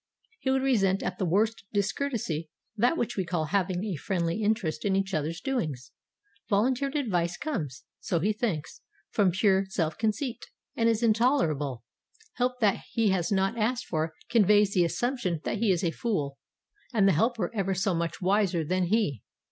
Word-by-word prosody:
He 265 - -2
would 265 0 +2
resent 195 -8 +2
as 180 - -1
the 185 - 0
worst 215 +6 +1
discourtesy 200 - -1 0.3
that 245 +9 +2
which 240 - -1
we 190 - 0
call 170 -3 -1
having 185 +2 0
a 200 -5 -2
friendly 170 +4 -1
interest 205 -8 0
in 195 -1 +1
each 195 0 -1
other's 155 +2 -1
doings. 155 - -3 0.6
Volunteered 255 +7 +1
advice 180 - 0
comes, 150 - -4 0.2
so 170 - -1
he 205 +6 +1
thinks, 205 -9 -3 0.3
from 200 -3 +3
pure 190 +1 +3
self 165 -5 -2
conceit, 230 +3 -2 0.3
and 230 0 +3
is 225 0 +1
intolerable; 190 - +2 0.5
help 250 0 -1
that 205 -3 +3
he 225 -2 +2
has 180 -2 0
not 195 +4 +1
asked 240 +3 0
for 160 -1 -2
conveys 210 -2 +4
the 180 - +4
assumption 190 - -1
that 210 - -2
he 220 -3 +3
is 180 -1 0
a 170 - +1
fool, 150 -11 -2 0.5
and 210 -5 +3
the - - +6
helper 220 +1 +1
ever 195 -3 0
so 190 +1 +1
much 170 -1 -2
wiser 190 -3 +2
than 185 +4 0
he. 175 - +1
195 Hz, 170 wpm, -28 LUFS, 170-225 Hz, 0.6 s, the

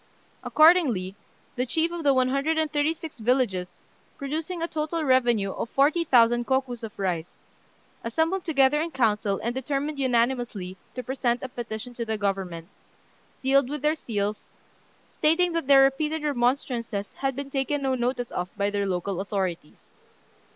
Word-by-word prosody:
Accordingly, 290 - +4 0.4
the 250 +1 -1
chiefs 330 +6 0
of 345 - -4
the 285 - +5
one 255 -1 +3
hundred 280 +4 0
and 315 -1 0
thirty 295 +2 +1
six 315 -5 -9
villages, 220 -6 0 0.4
producing 315 +5 -4
a - - 0
total 315 0 -2
revenue 240 -7 +2
of 230 - -4
40,000 255 -6 +3
kokus 260 -3 0
of 225 -2 -8
rice, 180 -4 -2 0.7
assembled 320 +11 0
together 295 -2 +3
in 335 - -2
council 215 -7 +1
and 235 - -1
determined 280 +3 -2
unanimously 240 -7 0 0.2
to 250 - -4
present 250 -2 -1
a 260 - -4
petition 240 0 -6
to 235 - -4
the 220 -1 -2
Government, 190 -5 -3 0.7
sealed 270 0 +2
with 295 0 -5
their 300 +1 +3
seals, 210 -8 -3 0.7
stating 345 +3 +2
that 330 -5 -2
their 275 -1 +8
repeated 300 +3 0
remonstrances 240 -6 -1
had 270 -1 -2
been 280 0 -6
taken 280 +1 -1
no 265 -1 +1
notice 245 -1 -2
of 180 +1 -3
by 200 0 0
their 200 -1 -1
local 185 0 -2
authorities. 190 -6 -4
255 Hz, 155 wpm, -26 LUFS, 220-295 Hz, 0.7 s, their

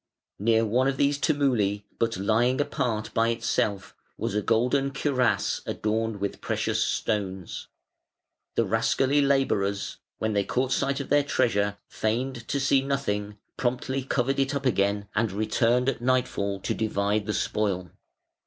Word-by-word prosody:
Near 115 +2 +3
one 125 +5 +2
of 135 0 0
these 140 +1 +2
tumuli, 120 -10 +1 0.2
but 115 -3 0
lying 115 +6 +2
apart 120 -7 -1
by 115 0 +3
itself, 105 -3 -1 0.2
was - - -2
a 105 - +1
golden 125 +6 +2
cuirass 135 -2 +1
adorned 110 0 -1
with 100 0 -3
precious - - 0
stones. 95 -4 -2 0.9
The - - +2
rascally 140 +2 +2
labourers, 120 -8 +1 0.2
when 110 0 -1
they 100 -1 +2
caught 130 +5 -1
sight 140 +1 +1
of 140 - -8
their 145 +1 +5
treasure, 105 -7 +1
feigned 120 +2 -2
to 140 - -1
see 135 0 +3
nothing, 105 -7 -2 0.2
promptly 130 +2 -1
covered 135 +1 0
it 135 +1 +1
up 140 0 -3
again, 100 -3 +1
and 110 -1 +1
returned 115 +5 +1
at 130 -3 0
nightfall 120 -6 0
to - - -1
divide 105 -1 0
the 105 - 0
spoil. 95 -4 -1
115 Hz, 145 wpm, -26 LUFS, 105-135 Hz, 0.9 s, their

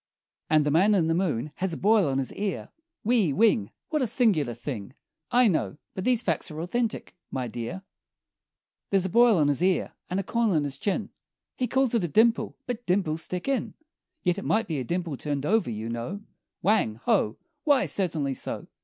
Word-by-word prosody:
And 155 -1 +4
The 150 - +1
Man 195 +7 +4
in 175 -4 +3
the 165 - +1
Moon 155 -6 -1
has 190 -2 -1
a - - -4
boil 205 -5 +4
on 135 - 0
his 135 -1 -2
ear 200 -1 -3 0.3
Whee! 220 -8 +3
Whing! 135 - +3 0.2
What 305 -2 0
a 255 - +2
singular 180 - +2
thing! 125 -1 -6 0.3
I 245 0 +5
know; 160 -5 0 0.2
but 190 - -5
these 245 -2 +2
facts 165 -3 -1
are 155 -1 -7
authentic, 215 +7 -2
my 130 -2 -3
dear, 120 - -5 1.1
There's 195 -2 +2
a - - -1
boil 235 +1 +5
on 150 -3 +3
his 145 +2 +1
ear, 185 0 +1 0.2
and 185 +2 -1
a - - -1
corn 230 +3 +1
on 160 -6 +2
his 140 -1 -4
chin 200 - -1 0.4
He 250 - -1
calls 265 +1 +1
it 230 -5 +2
a - - +1
dimple, 225 +9 +2
but 245 -1 -5
dimples 175 -4 +1
stick 180 +5 -4
in 275 -2 -1 0.5
Yet 180 +2 +1
it - - -7
might 225 +1 +1
be 155 -4 -2
a - - -2
dimple 170 +1 -3
turned 145 -1 -3
over, 210 - +2
you 110 0 -4
know; 120 - -4 0.4
Whang! 200 - +2
Ho! 105 - +2 0.3
Why, 285 -3 +4
certainly 160 -8 -1
so! - - -4
180 Hz, 200 wpm, -27 LUFS, 145-220 Hz, 1.1 s, I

